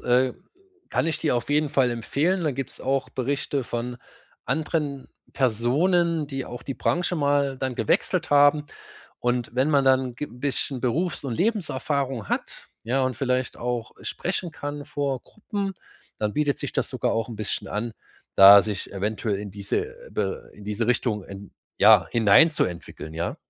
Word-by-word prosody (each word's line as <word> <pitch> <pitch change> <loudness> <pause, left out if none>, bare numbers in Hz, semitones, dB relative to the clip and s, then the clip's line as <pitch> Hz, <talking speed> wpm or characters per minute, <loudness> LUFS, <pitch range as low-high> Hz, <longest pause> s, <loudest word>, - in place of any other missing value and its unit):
äh, 125 +1 +3 0.6
kann - - +1
ich 160 -2 0
dir 150 -6 +1
auf 120 - -3
jeden 150 0 +3
Fall 135 -4 +3
empfehlen. 145 +10 0
Da 155 - +1
gibt's 135 -1 -6
auch 135 0 0
Berichte 135 +1 -2
von 120 +1 -4 0.5
anderen 150 -4 -2 0.2
Personen, 150 - +2
die 135 -2 -4
auch 120 - -8
die 135 - -5
Branche 175 +7 0
mal 140 -2 +1
dann 130 -2 -2
gewechselt 160 - 0
haben. 145 +1 +5 0.5
Und 120 -1 -1
wenn 130 +4 +2
man 140 -2 +4
dann 130 -2 +3
g 150 - -4
bisschen 130 +1 -3
Berufs 150 +6 -1
und 125 -4 -2
Lebenserfahrung 140 - -1
hat, - - -3 0.2
ja, 130 +4 0
und 130 -2 -1
vielleicht 130 -1 -1
auch 120 -2 -3
sprechen 175 - -3
kann 145 -1 -6
vor 140 -3 -2
Gruppen, 200 -2 -5 0.4
dann 105 -1 -1
bietet 145 -2 0
sich - - -4
das - - -1
sogar - - -1
auch 115 +1 -1
'n 115 - -7
bisschen 105 -1 -3
an, 115 +2 -3 0.4
da 100 +1 +10
sich 105 -2 -4
eventuell 105 +1 -2
in 100 0 -6
diese, 100 - -2 0.2
äh, - - -14
Be 475 +1 -3
in 105 - -13
diese 105 +2 -2
Richtung 115 -4 +1
en 100 0 -10 0.3
ja - - +7
hineinzuentwickeln, 100 - +3
ja. 85 +2 -3
130 Hz, 165 wpm, -25 LUFS, 115-150 Hz, 0.6 s, da